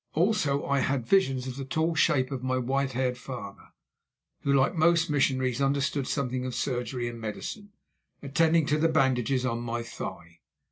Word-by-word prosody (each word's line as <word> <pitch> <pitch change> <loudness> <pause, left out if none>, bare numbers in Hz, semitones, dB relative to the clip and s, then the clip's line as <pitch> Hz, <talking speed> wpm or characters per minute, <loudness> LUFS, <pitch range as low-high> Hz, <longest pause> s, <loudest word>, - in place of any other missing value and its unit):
Also 155 -5 +1
I 140 0 +1
had 130 -3 0
visions 135 -9 +2
of 130 0 -6
the 135 - -4
tall 160 +5 0
shape 145 -4 +2
of 135 -2 -3
my 130 0 0
white 135 +2 -1
haired 125 0 -1
father, 120 -7 -8 0.7
who, 140 - 0
like 135 +3 +3
most 165 -1 +3
missionaries, 130 -2 +1
understood 140 0 0
something 130 -3 -1
of 130 -1 -4
surgery 125 -1 -2
and 120 -1 -7
medicine, 200 - -6 0.5
attending 160 +3 +2
to 150 +1 +1
the 165 +1 +3
bandages 130 -4 +2
on 115 -2 -1
my 120 0 -3
thigh. 85 -7 -8
135 Hz, 170 wpm, -28 LUFS, 125-150 Hz, 0.7 s, like